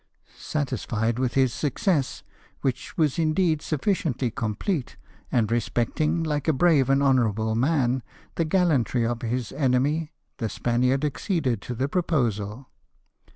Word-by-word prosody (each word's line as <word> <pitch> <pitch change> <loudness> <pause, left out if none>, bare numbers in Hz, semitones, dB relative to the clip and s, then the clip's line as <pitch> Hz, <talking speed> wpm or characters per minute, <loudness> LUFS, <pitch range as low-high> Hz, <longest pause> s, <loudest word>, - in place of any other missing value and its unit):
Satisfied 120 -5 -2
with 130 -2 -1
his 130 -3 +3
success, 145 - 0 0.4
which 130 -3 -3
was 155 -1 +2
indeed 160 0 +2
sufficiently 145 - -1
complete, 120 - -2 0.3
and 115 -3 +1
respecting, 135 +8 0
like 150 -2 -2
a 160 - +4
brave 145 -3 +3
and 135 +1 +3
honourable 110 -5 +2
man, 130 0 +1 0.3
the 165 - 0
gallantry 155 -9 +2
of 120 0 -2
his 120 0 -2
enemy, 145 +4 +1 0.3
the 115 -5 -2
Spaniard 125 +6 +1
acceded 140 - -1
to 125 - -5
the 130 +4 0
proposal. 125 - -1
130 Hz, 125 wpm, -25 LUFS, 120-155 Hz, 0.4 s, a